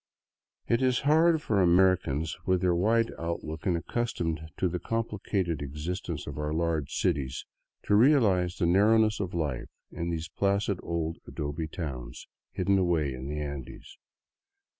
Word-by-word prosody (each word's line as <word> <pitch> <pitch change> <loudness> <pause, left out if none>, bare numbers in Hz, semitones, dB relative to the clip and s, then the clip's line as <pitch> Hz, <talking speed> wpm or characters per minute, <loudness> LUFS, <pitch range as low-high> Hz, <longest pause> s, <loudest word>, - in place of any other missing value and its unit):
It 115 - +2
is 130 -2 +2
hard 160 +2 +4
for 100 -3 +2
Amer 95 +1 +5
icans, 75 -2 -3
with 95 -1 +2
their 90 -2 +3
wide 115 +6 +2
outlook 85 +1 -4
and 90 -2 +2
accustomed 85 -6 -2
to 95 - +1
the 90 0 -3
complicated 100 -8 -2
e 70 - -3
xistence 80 +2 -4
of 70 0 -6
our 75 0 -2
large 80 -2 -1
cities, 65 -2 -1 0.4
to - - 0
realize 105 - +4
the 85 - +1
narrowness 105 +4 +4
of 95 -3 -3
life 75 -7 -2 0.2
in 85 +1 -4
these 80 -1 -3
placid 100 -1 0
old 85 -1 -3
adobe 75 +2 -4
towns 65 -8 -6 0.2
hidden 95 +1 +1
away 85 -6 +1
in 65 +1 -6
the 75 +1 -3
Andes. 70 -3 -7
85 Hz, 155 wpm, -28 LUFS, 75-100 Hz, 0.4 s, Amer